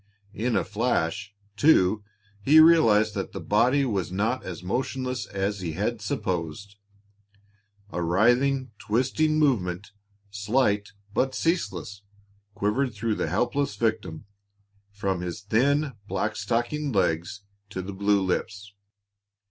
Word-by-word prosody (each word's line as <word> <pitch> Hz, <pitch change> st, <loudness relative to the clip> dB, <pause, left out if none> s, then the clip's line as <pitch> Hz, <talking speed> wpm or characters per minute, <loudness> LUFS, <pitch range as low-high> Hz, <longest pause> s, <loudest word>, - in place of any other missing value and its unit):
In 120 Hz, +4 st, -1 dB
a -, -, +2 dB
flash, 105 Hz, -3 st, -1 dB, 0.2 s
too, 105 Hz, -5 st, +4 dB, 0.4 s
he 150 Hz, +9 st, +6 dB
realized 115 Hz, -11 st, +6 dB
that 95 Hz, -2 st, -4 dB
the -, -, -5 dB
body 125 Hz, +7 st, +2 dB
was 100 Hz, -7 st, -2 dB
not 110 Hz, +7 st, -1 dB
as 90 Hz, -2 st, -7 dB
motionless 125 Hz, +2 st, -2 dB
as 100 Hz, +1 st, -2 dB
he 85 Hz, -4 st, -4 dB
had 105 Hz, +6 st, -2 dB
supposed. 95 Hz, 0 st, -3 dB, 1.1 s
A 85 Hz, -, -3 dB
writhing, 120 Hz, +9 st, +2 dB
twisting 135 Hz, +7 st, +1 dB
movement, 100 Hz, -, 0 dB, 0.4 s
slight 105 Hz, 0 st, 0 dB, 0.2 s
but 130 Hz, +3 st, 0 dB
ceaseless, 100 Hz, -, -2 dB, 0.5 s
quivered 110 Hz, +4 st, 0 dB
through 110 Hz, +1 st, -1 dB
the 80 Hz, -, -2 dB
helpless 120 Hz, -, 0 dB
victim, 105 Hz, -7 st, -2 dB, 0.7 s
from 100 Hz, -3 st, -2 dB
his 90 Hz, +1 st, -5 dB
thin, 135 Hz, +7 st, +1 dB
black 105 Hz, +1 st, -2 dB
stockinged 120 Hz, +6 st, -1 dB
legs 90 Hz, +2 st, 0 dB, 0.3 s
to 95 Hz, -2 st, -5 dB
the 100 Hz, +2 st, -6 dB
blue 100 Hz, 0 st, +2 dB
lips. 100 Hz, +2 st, -3 dB
105 Hz, 120 wpm, -26 LUFS, 95-125 Hz, 1.1 s, he